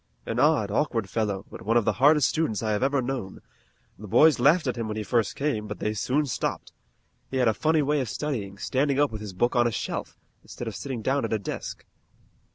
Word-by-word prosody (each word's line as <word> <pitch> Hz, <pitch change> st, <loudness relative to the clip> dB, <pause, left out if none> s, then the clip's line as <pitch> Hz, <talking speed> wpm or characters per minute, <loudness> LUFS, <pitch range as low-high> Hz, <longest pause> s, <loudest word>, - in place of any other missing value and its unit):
An 115 Hz, -, -2 dB
odd, 145 Hz, -8 st, +3 dB
awkward 115 Hz, -3 st, 0 dB
fellow, 100 Hz, -2 st, -2 dB
but -, -, -9 dB
one 115 Hz, +3 st, +2 dB
of 115 Hz, -, +2 dB
the 110 Hz, -, +2 dB
hardest 145 Hz, -1 st, +6 dB
students 120 Hz, -10 st, -1 dB
I 110 Hz, -, 0 dB
have 105 Hz, -, 0 dB
ever 135 Hz, 0 st, +1 dB
known. 120 Hz, -7 st, -4 dB, 0.6 s
The 105 Hz, -, -8 dB
boys 155 Hz, +9 st, +5 dB
laughed 150 Hz, +7 st, +4 dB
at 125 Hz, -3 st, -1 dB
him 115 Hz, -2 st, -3 dB
when 110 Hz, 0 st, -4 dB
he 110 Hz, -, -2 dB
first 115 Hz, -1 st, 0 dB
came, 130 Hz, -7 st, -1 dB
but 105 Hz, -, -5 dB
they 105 Hz, -, -2 dB
soon 135 Hz, +8 st, 0 dB
stopped. 130 Hz, -, -3 dB, 0.6 s
He 130 Hz, -, -3 dB
had 125 Hz, -2 st, +3 dB
a 110 Hz, -, +4 dB
funny 155 Hz, +5 st, +2 dB
way 145 Hz, 0 st, +1 dB
of 125 Hz, -, -3 dB
studying, 100 Hz, -4 st, -4 dB
standing 135 Hz, +6 st, 0 dB
up 145 Hz, -1 st, +3 dB
with 110 Hz, -1 st, -6 dB
his 105 Hz, -3 st, -7 dB
book 120 Hz, +7 st, 0 dB
on 120 Hz, -1 st, +4 dB
a -, -, -1 dB
shelf, -, -, -4 dB, 0.2 s
instead 120 Hz, -, -8 dB
of 110 Hz, -, -5 dB
sitting 125 Hz, 0 st, -5 dB
down 135 Hz, +3 st, +1 dB
at -, -, -2 dB
a -, -, +2 dB
desk. 100 Hz, -, -6 dB
120 Hz, 235 wpm, -26 LUFS, 105-140 Hz, 0.6 s, hardest